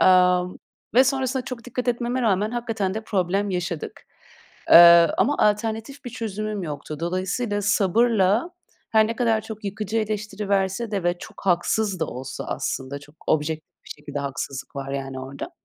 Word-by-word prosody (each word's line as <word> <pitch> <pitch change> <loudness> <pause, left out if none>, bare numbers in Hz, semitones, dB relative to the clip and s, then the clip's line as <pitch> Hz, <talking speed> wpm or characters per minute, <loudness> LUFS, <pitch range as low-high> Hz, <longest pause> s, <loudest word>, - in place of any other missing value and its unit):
Amm, 180 -1 +4 0.4
ve 255 +2 +7
sonrasında 260 -1 0
çok 240 -2 -7
dikkat 250 0 -4
etmeme 245 +1 0
rağmen 210 -1 +2
hakikaten 225 -5 -2
de 220 0 -4
problem 195 +1 0
yaşadık. 180 -3 -4 0.7
Eee, 170 0 +9
ama 290 - +3
alternatif 220 +5 0
bir 245 - -5
çözümüm 215 -3 -4
yoktu. 150 -1 -6
Dolayısıyla 190 +5 -1
sabırla 215 - +2 0.4
her 220 -1 +5
ne 230 - -4
kadar 225 -2 +2
çok 215 0 -9
yıkıcı 210 +2 -2
eleştiri 210 -1 -3
verse 195 +3 0
de 200 -3 -1
ve 175 0 +1
çok 195 - -12
haksız 190 +2 +1
da 160 - +1
olsa 130 +1 -6
aslında, 135 +2 -3
çok 145 +1 -17
objektif 155 +1 -2
bir - - -15
şekilde 145 -1 -6
haksızlık 140 -1 -5
var 135 0 -4
yani 135 -1 -4
orada. 135 +1 -7
200 Hz, 155 wpm, -24 LUFS, 175-225 Hz, 0.7 s, Eee